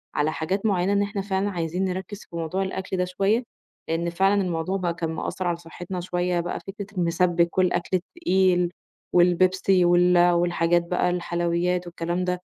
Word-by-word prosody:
على 150 +1 +1
حاجات 190 +7 -2
معيّنة 195 -1 +2
إن 200 - +2
إحنا 200 0 -2
فعلًا 195 +1 -1
عايزين 175 +1 -2
نركِّز 190 +3 -5
في 170 - -10
موضوع 170 +4 -2
الأكل 190 0 -4
ده 180 - +1
شوية، 195 +6 +1 0.5
لإن 170 +1 0
فعلًا 195 +3 +2
الموضوع 180 +1 -1
بقى 175 -2 -1
كان 165 -2 -3
مأثّر 175 +3 -3
على 170 -1 0
صحتنا 175 +2 -7
شوية، 180 0 -1
بقى 175 +1 -3
فكرة 200 +1 -7
المسبِّك 170 0 +1
والأكل 180 -2 +1
التقيل 185 - +1 0.4
والبيبسي 180 +1 +4
وال 175 0 +4
والحاجات 175 0 +2
بقى 180 0 +1
الحلويات 175 0 -1
والكلام 175 +1 -2
ده، 180 0 -2
180 Hz, 165 wpm, -24 LUFS, 170-190 Hz, 0.5 s, والبيبسي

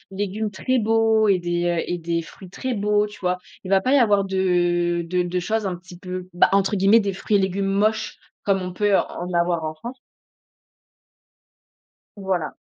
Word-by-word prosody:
légumes 205 +2 -2
très 255 +6 -1
beaux 225 0 +3
et 195 -3 +3
des, 175 0 -2
heu 170 -1 0
et 175 - -1
des 170 0 -2
fruits 185 +3 -13
très 255 +7 -4
beaux, 210 0 +1
tu 210 - -13
vois? 180 -1 0 0.3
Il 185 - -7
va 195 0 +4
pas 255 +7 +1
y - - +6
avoir 205 -6 +4
de 175 -2 +1
de 180 +1 0
de 175 +1 -2
choses 215 +4 -1
un 185 -2 -2
petit 175 0 -13
peu, 185 0 -6
bah, 175 - +4
entre 195 +1 +2
guillemets, 200 +4 +5
«des 200 -2 -1
fruits 205 +2 0
et - - +1
légumes 190 +1 -1
moches», 210 +3 0 0.3
comme 195 -1 +1
on 180 0 -4
peut 205 +1 +2
en 175 +1 -4
avoir 170 -1 +1
en 155 - -3
France. 235 +12 -9 2.2
Voilà. 190 -4 -2
190 Hz, 195 wpm, -22 LUFS, 175-210 Hz, 2.2 s, y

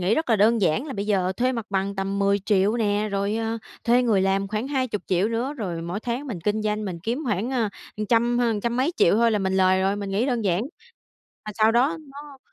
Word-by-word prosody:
nghĩ 185 +5 +2
rất 315 -5 -1
là 225 - +5
đơn 220 +3 +3
giản 185 - +1
là 275 - -5
bây 200 -2 -4
giờ 190 -3 +1
thuê 255 +1 +1
mặt 230 -4 -4
bằng 195 0 -1
tầm 195 +1 -2
10.000.000 200 +1 +2
nè, 210 -1 0
rồi, 200 +2 -1
ờ, 225 0 -2 0.3
thuê 240 +2 +4
người 220 -6 +2
làm 195 +1 +1
khoảng 215 +5 -3
20.000.000 220 -8 0
nữa, 240 +5 -2
rồi 180 - -4
mỗi 175 +5 -4
tháng 245 +5 -3
mình 200 -10 -5
kinh 210 +4 -1
doanh, 210 0 -1
mình 180 -4 -4
kiếm 235 +9 -2
khoảng, 215 0 -1
ờ, 240 -5 0 0.4
trăm 240 +1 +2
hơn 230 -4 +1
trăm 235 +2 -1
mấy 275 +7 +1
triệu 170 - +4
thôi 230 +1 +4
là 215 - +1
mình 190 -1 0
lời 185 0 +4
rồi. 195 +2 +1
Mình 200 -1 -5
nghĩ 210 +7 0
đơn 240 -4 -1
giản, 190 +1 +1 0.8
mà 215 - -6
sau 220 +1 +4
đó 265 +8 +2 0.2
nó 285 -1 -11
215 Hz, 240 wpm, -24 LUFS, 195-240 Hz, 0.8 s, là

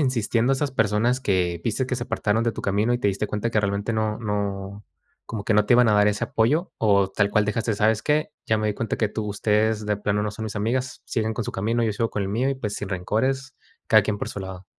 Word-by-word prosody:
insistiendo 120 -2 +1
a - - +4
esas 140 0 -1
personas 115 +3 +1
que 90 -6 0
viste 120 +3 0
que 130 - -2
se 120 - -4
apartaron 115 -1 0
de 115 - +1
tu - - -6
camino 105 +4 +1
y - - 0
te 105 - +2
diste 100 +2 -1
cuenta 105 +2 -1
que 110 - +1
realmente 100 +2 -1
no 110 0 -1
no 100 -2 -3 0.4
como 110 -3 -5
que 110 - +1
no 105 - +4
te - - +4
iban 125 -1 +5
a 105 - +4
dar 105 0 +5
ese 105 +3 0
apoyo, 145 +11 +1
o 100 -3 +3
tal 100 +1 +1
cual 105 -1 +2
dejaste? 110 +1 0
¿Sabes 110 +1 +2
qué? 150 +1 +1 0.2
ya 110 -1 +2
me 110 - -1
di 105 - -1
cuenta 115 - -2
que 110 - +1
tú 110 0 -4
ustedes 105 +1 +1
de 105 -1 +1
plano 105 0 -1
no 105 - -1
son 110 - -7
mis 110 - -5
amigas, 125 +5 -1
siguen 110 -1 -1
con 115 - -3
su - - -2
camino, 115 +4 0
yo 110 - +1
sigo 115 +2 -1
con 105 - -3
el 95 - -2
mío 125 +7 0
y, 135 - -1
pues, 105 -5 -4
sin 105 - -5
rencores, 130 +9 -1 0.3
cada 110 -1 +6
quien 105 0 -2
por - - -4
su 100 - -6
lado. 95 -1 -8
110 Hz, 270 wpm, -24 LUFS, 105-115 Hz, 0.4 s, cada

